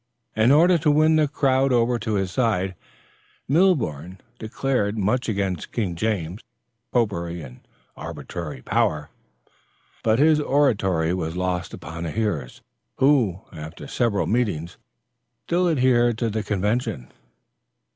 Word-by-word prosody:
In 110 +4 +4
order 170 +4 +5
to 155 0 +2
win 155 +2 +4
the 155 -1 +3
crowd 135 -2 +1
over 120 0 +2
to 110 -1 -2
his 95 -2 -1
side, 100 -6 0 0.7
Milborne 120 - +1 0.2
declaimed 110 -2 -1
much 110 +5 0
against 95 -5 -2
King 100 -7 -2
James, 95 -1 -2 0.5
popery 85 -8 -1
and 65 -2 -11 0.4
arbitrary 75 -7 -7
power; 75 -1 0 0.9
but 110 0 +3
his 155 +2 +4
oratory 100 - +1
was 85 -2 -3
lost 90 -1 -2
upon 85 0 -8
the 85 -2 -3
hearers, 100 - -3 0.3
who, 130 -10 +2
after 80 -1 -9
several 115 -5 0
meetings, 100 -8 -1 0.6
still 175 +1 +1
adhered 125 -5 +3
to 115 -2 -1
the 110 +1 -1
convention. 105 - -2
110 Hz, 125 wpm, -23 LUFS, 90-130 Hz, 0.9 s, order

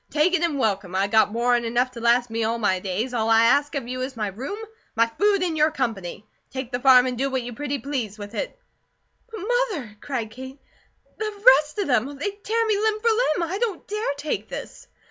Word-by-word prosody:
Take 310 +4 +2
it 370 - +2
an' 335 -4 0
welcome. 200 -6 -1
I 195 +1 +2
got 220 +1 +3
more 240 +2 +1
'an 240 - 0
enough 245 +2 0
to 245 - -9
last 240 0 +3
me 225 0 -1
all 225 +1 0
my 190 -5 +1
days; 200 +7 -3
all 225 -2 0
I 225 0 +6
ask 285 +6 +3
of 265 -4 -3
you 255 +1 -4
is 260 -1 -4
my 210 -2 -1
room, 260 - -6 0.4
my 230 0 +4
food, 400 - +1
and 340 -3 -1
your 305 0 +4
company. 225 - -4 0.2
Take 260 -2 -6
the 245 - -1
farm, 255 -1 +7
and 255 -1 -2
do 275 +1 +1
what 260 -2 -1
you 245 0 -6
pretty 285 +3 -3
please 245 -5 -4
with 205 +1 -8
it." - - -4 0.7
"But, 445 -3 -7
Mother!" 415 - -1
cried 240 -6 -4
Kate. 260 +3 -9 0.6
"The 425 -1 -4 0.2
rest 300 +3 -7
of 405 - 0
them! 260 +2 +1
They'd 405 +7 -4
tear 455 +1 +1
me 425 -2 +1
limb 430 0 +1
for 460 +2 +2
limb. 360 -8 +1
I 390 - -2
don't 445 -7 -2
DARE 425 -7 -2
take 295 +2 -3
this." - - -8
260 Hz, 230 wpm, -24 LUFS, 230-345 Hz, 0.7 s, farm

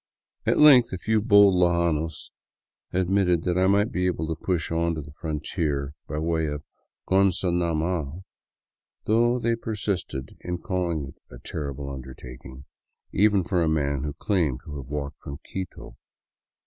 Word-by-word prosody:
At - - +3
length 130 -6 +7
a 95 - -3
few 110 +3 +1
bold 100 -3 +6
lojanos 85 -3 +1 0.6
admitted 90 -2 +2
that 90 -1 0
I 95 +1 +3
might 100 +3 +3
be 90 0 0
able 80 -3 -1
to 80 - -1
push 85 0 -2
on 85 0 +1
to 80 - -4
the 70 - -12
frontier 75 -3 -2
by 75 - -4
way 80 0 0
of 75 0 -4 0.4
Gonzanama, 85 -4 +1 0.8
though 120 +3 +3
they 115 -1 +1
persisted 100 - -4
in 90 0 -4
call 90 0 -2
ing 80 -5 -2
it - - -16
a - - -10
" - - -25
terrible 70 -2 -4
undertaking," 65 0 -9 0.5
even 100 -1 +3
for 90 0 0
a 80 - +2
man 70 -3 0
who 75 0 -3
claimed 75 - 0
to 75 -2 -7
have 65 -2 -8
walked 70 0 -5
from 70 0 -7
Quito. 95 -9 -6
85 Hz, 160 wpm, -25 LUFS, 75-95 Hz, 0.8 s, length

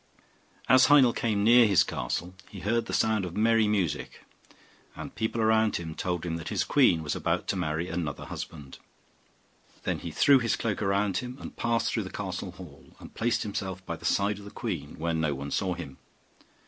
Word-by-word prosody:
As 130 +1 +6
Heinel 135 -5 +6
came 105 -3 0
near 120 +1 +7
his 100 -4 +5
castle 75 +8 -4 0.2
he 95 - -9
heard 115 +4 0
the - - -5
sound 110 -3 +1
of 90 0 -5
merry 110 0 +3
music; 95 -8 -1 0.7
and - - -7
the - - -32
people 110 +1 -2
around 110 0 +3 0.2
told 90 -1 -2
him 85 -1 -2
that 80 - -6
his - - 0
queen 80 -2 +3
was 75 - -2
about - - -1
to - - +1
marry 80 -1 -2
another 85 -5 -4
husband. 70 -5 -8 1.0
Then - - -1
he - - -6
threw 140 -2 +5
his 115 -3 0
cloak 110 -3 -2
around 100 -1 +1
him, 125 +3 -5
and - - -9
passed 115 -1 0
through 115 - 0
the 95 - -6
castle 95 -2 -5
hall, 85 -6 -14
and - - -12
placed 115 +1 0
himself 95 -3 -5
by 85 - -4
the 85 - -16
side 100 +3 +1
of 100 - -12
the - - -8
queen, - - -5
where 85 +1 -1
no 80 -3 0
one 70 +1 -6
saw 95 -2 0
him. 75 -6 -9
100 Hz, 200 wpm, -28 LUFS, 85-110 Hz, 1.0 s, near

